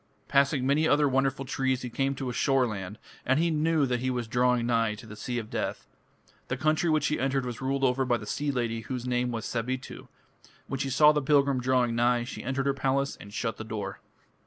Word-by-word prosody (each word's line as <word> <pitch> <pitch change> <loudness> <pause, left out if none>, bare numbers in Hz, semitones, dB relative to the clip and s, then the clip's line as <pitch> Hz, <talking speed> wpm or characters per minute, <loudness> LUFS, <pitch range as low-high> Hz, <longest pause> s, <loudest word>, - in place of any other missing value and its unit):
Passing 140 -1 +2
many 145 +4 +3
other 145 -1 +4
wonderful 135 0 0
trees, 130 0 -1
he 125 - -4
came 135 +3 0
to 135 -1 -4
a 125 - -3
shoreland, 110 -9 0 0.3
and 130 +2 +2
he 170 0 +2
knew 155 -1 +2
that 125 -2 -1
he 130 +1 -1
was 125 -2 -2
drawing 125 +1 +2
nigh 115 -2 +1
to 110 - -12
the 110 -1 -10
Sea 120 +3 -4
of 110 -2 -5
Death. - - -3 0.6
The 125 - -2
country 155 +4 +1
which 155 -2 +2
he 150 -2 0
entered 135 0 0
was 120 -1 -5
ruled 135 +1 -1
over 130 0 +2
by 125 -2 +1
the 105 - -9
sea 145 +7 -2
lady 120 -4 -1
whose 125 +2 -5
name 125 0 0
was 115 -1 -4
Sabitu. 125 +2 -4 0.6
When 135 - -4
she 135 0 -1
saw 150 +3 +6
the 150 -1 0
pilgrim 140 -2 +3
drawing 125 -1 +2
nigh, 120 0 +2
she 125 - -7
entered 135 +2 -1
her 140 - +2
palace 135 +1 0
and 100 - -12
shut 115 +2 -3
the - - -6
door. 105 -3 -5
130 Hz, 225 wpm, -28 LUFS, 120-140 Hz, 0.6 s, saw